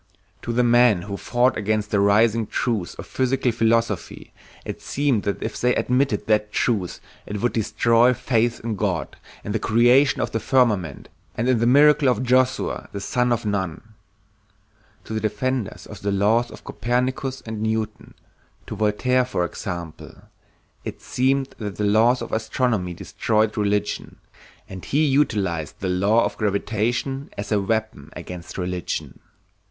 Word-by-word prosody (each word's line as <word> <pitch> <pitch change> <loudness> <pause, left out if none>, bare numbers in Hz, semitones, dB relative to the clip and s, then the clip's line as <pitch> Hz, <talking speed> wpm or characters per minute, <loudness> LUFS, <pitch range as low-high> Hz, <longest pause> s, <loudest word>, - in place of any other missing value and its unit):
To 120 - -4
the 120 +1 +2
men 120 -6 +4
who 100 0 -5
fought 120 +3 +1
against 105 0 -1
the 105 - +2
rising 110 +2 +3
truths 110 -7 -2
of - - -8
physical 130 -1 0
philosophy, 115 -4 -1 0.3
it - - -6
seemed 140 -6 0
that 100 - -2
if - - -4
they 125 0 +3
admitted 125 -5 +1
that 105 -1 +1
truth 105 -8 -1 0.3
it 105 0 -4
would 120 +4 0
destroy 115 +2 +3
faith 120 -1 0
in 115 -2 -3
God, 95 -4 -2 0.3
in 105 - -4
the 110 - 0
creation 120 +6 +4
of - - -1
the 115 - -1
firmament, 105 - +1 0.3
and 115 - -1
in 130 -3 +3
the 115 - +2
miracle 145 +1 +5
of 125 0 0
Joshua 130 +1 +1
the 100 - -5
son 125 +4 0
of 120 -1 0
Nun. 100 +1 -3 1.1
To - - -7
the 110 - 0
defenders 110 +2 -2
of - - -11
the 100 - -1
laws 110 +5 +2
of - - -12
Copernicus 130 +3 -2
and 110 -1 -6
Newton, 110 -1 -3 0.5
to - - -6
Voltaire 125 +5 +2
for 105 -8 -1
example, 85 -3 -7 0.6
it - - -6
seemed 135 +1 0
that 105 -3 -5
the 105 - -3
laws 115 +4 +3
of - - -8
astronomy 110 -5 -1
destroyed 110 +4 0
religion, 105 -1 -1 0.5
and 95 -1 -9
he 150 +3 +1
utilized 100 - 0
the 95 - -2
law 100 +5 +3
of 105 - -4
gravitation 110 +6 -1
as 100 +1 -5
a 105 -2 +2
weapon 110 -8 -2
against 90 -1 -8
religion. 90 -1 -4
110 Hz, 155 wpm, -23 LUFS, 100-125 Hz, 1.1 s, miracle